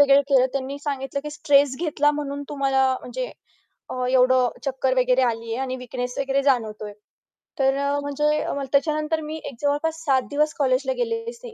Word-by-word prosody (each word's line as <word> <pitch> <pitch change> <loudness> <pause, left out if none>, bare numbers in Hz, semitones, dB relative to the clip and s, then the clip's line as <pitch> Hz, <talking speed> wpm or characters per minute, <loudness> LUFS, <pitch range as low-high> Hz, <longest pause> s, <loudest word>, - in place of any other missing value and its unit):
वगैरे 280 0 +6
केलं. 260 -2 +5
त्यांनी 275 +1 -3
सांगितलं 280 -1 -3
की 300 - -4
स्ट्रेस 290 -3 +3
घेतला 295 -3 +2
म्हणून 285 -1 -4
तुम्हाला 270 -2 +2
म्हणजे - - -4 0.6
अ, 255 0 -2
एवढं 255 -1 +4 0.2
चक्कर 265 -1 0
वगैरे 255 +1 +3
आली 230 -2 -1
आहे - - -3
आणि 260 -1 -3
विकनेस 250 +1 -5
वगैरे 275 0 +1
जाणवतोय. 215 -6 0 0.7
तर 270 0 +3
अ, 280 +1 0
म्हणजे 285 0 -1
त्याच्यानंतर 305 +2 +1
मी 310 +1 -5
एक 265 - -6
जवळपास 320 +3 -1
7 265 -2 +3
दिवस 300 +1 +1
कॉलेजला 265 - +2
गेलेलेच 465 0 -3
नाही. 470 -2 -9
280 Hz, 165 wpm, -23 LUFS, 260-300 Hz, 0.7 s, वगैरे